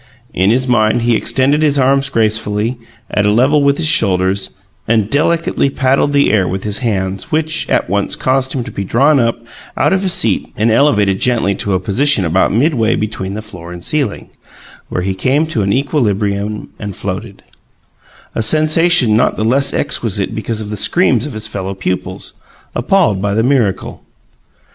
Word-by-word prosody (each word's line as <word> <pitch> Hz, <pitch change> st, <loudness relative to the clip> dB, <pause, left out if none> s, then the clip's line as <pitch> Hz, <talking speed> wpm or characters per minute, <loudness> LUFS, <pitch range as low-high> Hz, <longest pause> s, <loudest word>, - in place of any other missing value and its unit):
In 95 Hz, +3 st, +1 dB
his 130 Hz, +3 st, +1 dB
mind 115 Hz, -1 st, +1 dB
he 120 Hz, -1 st, +2 dB
extended 140 Hz, +6 st, +1 dB
his 145 Hz, -2 st, +2 dB
arms 135 Hz, +1 st, +2 dB
gracefully, 110 Hz, 0 st, -1 dB, 0.3 s
at 105 Hz, 0 st, +1 dB
a -, -, +3 dB
level 130 Hz, +7 st, +3 dB
with 140 Hz, 0 st, +2 dB
his 170 Hz, -, -2 dB
shoulders, 95 Hz, -, +2 dB, 0.4 s
and 110 Hz, -2 st, 0 dB
delicately 155 Hz, -1 st, +1 dB
paddled 135 Hz, +2 st, +1 dB
the 140 Hz, 0 st, +2 dB
air 95 Hz, -4 st, +1 dB
with 95 Hz, +1 st, -4 dB
his 105 Hz, 0 st, 0 dB
hands, 100 Hz, -, -3 dB
which 155 Hz, +1 st, 0 dB
at -, -, 0 dB
once 100 Hz, +2 st, -1 dB
caused 130 Hz, 0 st, -1 dB
him 130 Hz, -, -3 dB
to -, -, -9 dB
be 100 Hz, -, -5 dB
drawn 140 Hz, +9 st, +2 dB
up 115 Hz, -1 st, 0 dB, 0.4 s
out -, -, +2 dB
of 190 Hz, -, +1 dB
his 190 Hz, -3 st, +1 dB
seat 185 Hz, -, +1 dB
and 110 Hz, +2 st, +1 dB
elevated 105 Hz, -7 st, +2 dB
gently 115 Hz, -6 st, +1 dB
to 100 Hz, +1 st, -2 dB
a -, -, 0 dB
position 105 Hz, +3 st, +2 dB
about 85 Hz, +3 st, +1 dB
midway 115 Hz, -1 st, +1 dB
between 100 Hz, -2 st, -4 dB
the 110 Hz, -, -6 dB
floor 90 Hz, -5 st, -10 dB
and 90 Hz, 0 st, -9 dB
the -, -, -5 dB
ceiling, 145 Hz, -9 st, -2 dB, 0.6 s
where 90 Hz, -, -3 dB
he 95 Hz, +1 st, -1 dB
came 130 Hz, +11 st, 0 dB
to 155 Hz, -9 st, -2 dB
an 100 Hz, 0 st, 0 dB
equilibrium 105 Hz, -6 st, -1 dB
and 100 Hz, -3 st, -6 dB
floated; 100 Hz, +1 st, -6 dB, 0.9 s
a -, -, -2 dB
sensation 155 Hz, -1 st, +4 dB
not 120 Hz, -, +1 dB
the -, -, -3 dB
less 135 Hz, +5 st, +3 dB
exquisite 110 Hz, -7 st, 0 dB
because 110 Hz, 0 st, -3 dB
of 105 Hz, -1 st, -7 dB
the 105 Hz, -, -4 dB
screams 130 Hz, -, +2 dB
of 145 Hz, -, -8 dB
his 110 Hz, 0 st, -2 dB
fellow 100 Hz, -2 st, -5 dB
pupils, 95 Hz, -1 st, -4 dB, 0.4 s
appalled 120 Hz, -, +1 dB
by 100 Hz, 0 st, -1 dB
the 110 Hz, -, +1 dB
miracle. 120 Hz, -7 st, -1 dB
110 Hz, 180 wpm, -14 LUFS, 100-140 Hz, 0.9 s, sensation